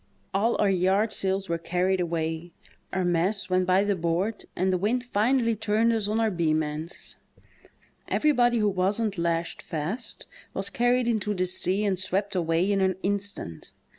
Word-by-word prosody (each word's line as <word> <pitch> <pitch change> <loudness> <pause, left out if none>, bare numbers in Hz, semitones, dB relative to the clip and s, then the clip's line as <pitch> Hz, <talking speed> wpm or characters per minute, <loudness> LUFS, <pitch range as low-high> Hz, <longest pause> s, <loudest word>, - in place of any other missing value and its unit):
All 220 +5 +1
our 205 - +4
yard 190 +4 +2
sails 195 0 0
were 170 0 -1
carried 180 +3 0
away, 165 -1 -2 0.4
our 190 -1 0
masts 185 +3 +1
went 185 0 +2
by 185 +2 +4
the 205 -1 +1
board, 180 +5 -1
and 185 +1 +1
the - - +2
wind 235 +6 0
finally 235 +1 +2
turned 220 +2 +1
us 220 -3 0
on 215 +2 0
our 225 -1 +2
beam 160 -3 +1
ends. 155 +3 -6 0.9
Everybody 245 -6 +3
who 210 -2 +2
wasn't 195 +1 0
lashed 170 0 -1
fast 170 +10 -4 0.3
was - - -3
carried 245 -1 +2
into 210 -3 0
the 185 0 +1
sea 185 +3 0
and 190 -3 0
swept 195 +2 -1
away 170 +1 +1
in 200 -1 +2
an 190 -1 +2
instant. 200 - -3
190 Hz, 165 wpm, -26 LUFS, 175-215 Hz, 0.9 s, our